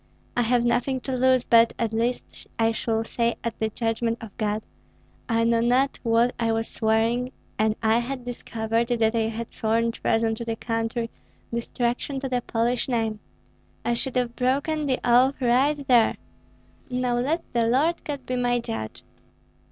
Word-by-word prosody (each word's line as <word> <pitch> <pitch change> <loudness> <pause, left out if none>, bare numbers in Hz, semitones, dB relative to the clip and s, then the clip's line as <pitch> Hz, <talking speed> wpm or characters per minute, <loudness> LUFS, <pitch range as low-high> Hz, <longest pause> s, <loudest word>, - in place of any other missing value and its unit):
I 245 - +2
have 240 +1 +2
nothing 255 +2 +1
to 265 0 -3
lose; 255 0 +3
but 230 0 +5
at 225 -1 -1
least 235 +2 -2
I 225 0 +3
shall 225 0 -1
say 235 +1 0
at 235 -1 -4
the 220 - 0
judgment 230 +1 -1
of 220 -4 -10
God: 210 0 -1 0.7
'I 230 0 +2
knew 230 0 +3
not 255 +3 +2
what 235 +1 +3
I 230 -1 +1
was 225 0 -1
swearing, 230 +3 +1 0.3
and 215 0 +2
had 235 +4 +1
I - - -16
discovered 230 -1 -2
that 230 -2 +2
I 225 -1 +1
had 230 +1 -5
sworn 230 +1 +1
treason 225 -1 +1
to 225 - -5
the 230 -1 -2
country, 230 0 -2 0.4
destruction 240 +3 -2
to 270 - -3
the 250 -1 0
Polish 240 +3 0
name, 225 -3 0 0.7
I 240 - +2
should 255 +2 -3
have 245 -1 0
broken 285 +4 0
the 260 -2 +1
oath 250 +3 +4
right 270 +3 +2
there.' 240 -3 +4 0.7
Now 250 -1 0
let 315 +7 0
the 235 -1 +2
Lord 300 +8 +2
God 285 -3 -5
be 255 - -2
my 245 0 +2
judge." 110 - -5
235 Hz, 170 wpm, -25 LUFS, 225-250 Hz, 0.7 s, but